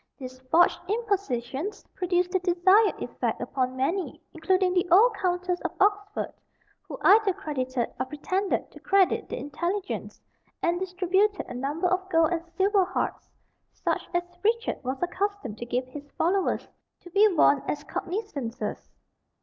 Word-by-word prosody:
These 255 -2 -9
"forged 345 +2 +4
impositions" 400 - -2
produced 360 -1 0
the 375 - +2
desired 370 +4 +4
effect - - -2
upon 255 -1 -2
many, 345 +9 -1
including 365 +3 +2
the 360 -1 +1
old 430 +7 +6
Countess 360 -2 -1
of - - -3
Oxford, 410 +1 +1 0.5
who - - -6
either 415 -1 +6
credited 255 -7 -2
or 255 - -1
pretended 370 +8 -2
to - - -13
credit 390 -2 +2
the - - -4
intelligence, 350 +7 -4 0.4
and 345 +1 0
distributed 380 +2 +1
a - - -7
number 280 +7 -2
of 375 +1 -1
gold 325 -1 +3
and 335 -1 -1
silver 390 0 +4
harts, 375 +1 -3 0.4
such - - -2
as 350 - +2 0.2
Richard 460 +2 0
was 260 +1 -2
accustomed 365 - -2
to 240 - -6
give 250 +2 -1
his 285 +3 -10
followers, 370 +3 +1 0.3
to 350 - -13
be 410 +4 +6
worn 285 -3 +5
as 295 0 -2
cognizances. 280 - -4
360 Hz, 145 wpm, -27 LUFS, 290-395 Hz, 0.5 s, old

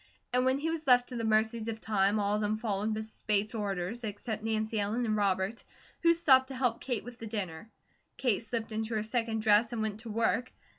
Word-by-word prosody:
And 250 0 +3
when 260 +1 +3
he 320 +3 -1
was 320 -2 -4
left 245 -1 +5
to 250 - -6
the 230 - -2
mercies 220 +1 +1
of 225 -1 -3
time, 205 -1 +1
all 205 0 +1
of 210 - 0
them 210 +1 0
followed 215 -1 -1
Mrs. 220 0 -5
Bates' 210 +1 +2
orders, 205 +1 -3
except 215 +1 -4
Nancy 220 0 -1
Ellen 215 +4 0
and 215 -1 +1
Robert, 200 +1 0 0.4
who 335 0 +5
stopped 265 -6 +5
to 265 - -7
help 250 -3 0
Kate 245 -5 -2
with 245 0 -10
the 225 - -6
dinner. 205 -2 -5 0.5
Kate 240 -7 +1
slipped 230 0 -4
into 220 +1 -2
her 215 - 0
second 225 -1 -1
dress 220 +2 +4
and 220 -2 -1
went 215 -1 -3
to 230 0 -8
work. 225 +2 0
220 Hz, 225 wpm, -31 LUFS, 210-240 Hz, 0.5 s, left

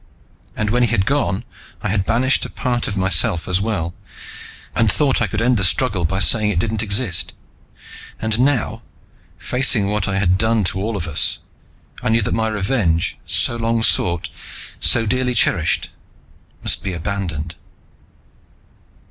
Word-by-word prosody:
And 105 0 -1
when 125 +2 +2
he 120 - +3
had 100 -4 +1
gone, 120 -6 0 0.4
I - - -1
had 95 -1 0
banished 130 +4 +2
a - - -5
part 120 -2 -2
of 100 - -4
myself 85 -3 +1
as 95 +1 +1
well, 95 -6 -2 0.8
and 115 -2 +3
thought 140 -5 +1
I 115 - +2
could 105 - -2
end 125 0 +3
the 100 - 0
struggle 95 -1 +2
by 95 +4 -1
saying 105 +2 +3
it 105 - -1
didn't 110 +4 0
exist. 100 -5 0 0.9
And 110 0 -1
now, 130 -3 +1 0.6
facing 125 -6 +2
what 105 0 -1
I 100 0 -1
had 95 -1 +2
done 110 0 +2
to 95 +1 -1
all 110 +1 -2
of 85 - -3
us, 80 -4 +1 0.6
I - - -1
knew 115 0 +2
that - - -2
my 110 0 0
revenge 100 -5 0
so 120 - +2
long 115 0 0
sought, 85 -5 +2 0.5
so 115 -2 +3
dearly 125 +2 0
cherished 85 -7 +1 0.7
must - - +2
be 95 - -3
abandoned. 85 -3 -4
105 Hz, 160 wpm, -19 LUFS, 95-115 Hz, 0.9 s, he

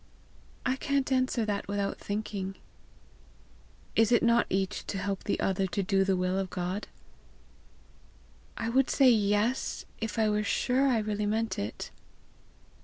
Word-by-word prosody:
"I 260 0 +1
can't 275 -1 0
answer 255 -3 +2
that 205 -1 -2
without 200 0 -2
thinking." 200 -2 -4 1.4
"Is 225 +1 +4
it 240 - +4
not 235 0 +4
each 190 0 -1
to 200 - -3
help 195 0 -3
the - - 0
other 190 0 +1
to 195 +2 -1
do 195 +1 +2
the 190 0 +2
will 185 +1 0
of 190 -1 -2
God?" 180 +4 -3 1.7
"I 225 - -2
would 255 +3 +2
say 265 -3 +6
YES 210 +3 +1
if 225 +1 -4
I 220 -1 +3
were 210 0 +1
sure 255 +5 +2
I 250 -3 +3
really 210 -1 -1
meant 220 +2 -1
it." 100 - -5
210 Hz, 150 wpm, -29 LUFS, 195-235 Hz, 1.7 s, say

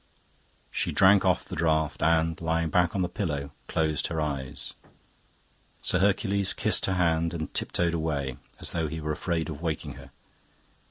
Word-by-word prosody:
She - - 0
drank 95 +1 +6
off - - +2
the - - -6
draught 80 -1 +1
and, 80 +2 +2
lying 80 -1 0
back 90 +2 +2
on 95 - +1
the - - 0
pillow, 75 -7 -3 0.2
closed 80 -2 0
her 80 - -3
eyes. 70 -4 -3 1.1
Sir 95 - +2
Hercules 100 0 +2
kissed - - +2
her 95 - +1
hand 85 -1 +1
and 80 -2 -5
tiptoed 85 -1 0
away, 75 -6 -2 0.2
as - - 0
though 80 -2 -1
he 80 +2 -5
were 75 0 -2
afraid 80 +1 -1
of 75 -2 -6
waking 80 -4 -3
her. - - -14
80 Hz, 165 wpm, -27 LUFS, 80-90 Hz, 1.1 s, drank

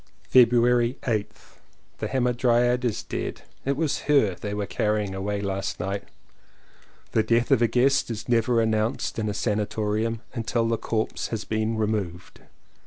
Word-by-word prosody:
February 120 0 +4
8th. 110 -4 -4 0.4
The - - -2
Hamadryad 125 -1 +2
is 120 -4 -1
dead. - - -5 0.2
It 140 0 0
was 155 -2 0
her 135 -10 +4
they 100 +3 -6
were 105 -1 -2
carrying 105 -1 -1
away 100 +1 -2
last 100 -1 -3
night. 100 +2 -3 1.1
The 110 - +3
death 115 +2 +1
of - - +5
a 120 - +5
guest 135 +3 +2
is 110 -2 -5
never 120 0 +2
announced 110 +3 0
in 110 -1 -1
a - - -2
sanatorium 110 +1 -1
until 115 -1 0
the 115 0 +1
corpse 110 -1 -2
has 110 -2 -4
been 110 +1 -1
removed. 105 -5 -3
115 Hz, 150 wpm, -25 LUFS, 105-120 Hz, 1.1 s, of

